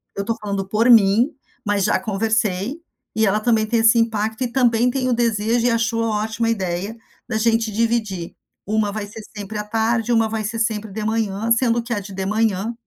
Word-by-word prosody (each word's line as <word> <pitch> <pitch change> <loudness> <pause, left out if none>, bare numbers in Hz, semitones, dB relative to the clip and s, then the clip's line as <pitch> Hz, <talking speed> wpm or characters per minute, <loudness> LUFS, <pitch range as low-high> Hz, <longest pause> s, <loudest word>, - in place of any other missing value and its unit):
eu 200 - -2
tô 230 +1 -1
falando 200 -2 -3
por 220 +4 +2
mim, 230 +5 +5 0.3
mas 205 -1 +1
já - - +2
conversei, 220 - -1 0.3
e 220 0 +3
ela 205 +1 +2
também 220 -1 +2
tem 230 0 +1
esse 225 +1 +5
impacto 220 +1 -1
e - - 0
também 245 -2 +3
tem 260 -1 -1
o - - +2
desejo, 230 0 +1
e - - +3
achou 230 0 0
ótima 220 +1 -1
a - - +2
ideia 190 0 -3 0.3
da 220 -3 -1
gente 225 0 +1
dividir: 215 -5 -1 0.3
uma 210 0 0
vai 210 0 -5
ser 215 +2 -10
sempre 210 +1 -6
à - - -2
tarde, 225 +2 0
uma 225 -1 +2
vai 220 -1 -3
ser 230 +2 -3
sempre 215 -2 -1
de 215 +2 -5
manhã, 220 0 -1
sendo 235 0 +3
que 235 0 -3
a 205 - -1
de 200 0 -9
de 190 0 -3
manhã", 215 +1 0
220 Hz, 210 wpm, -21 LUFS, 205-230 Hz, 0.3 s, mim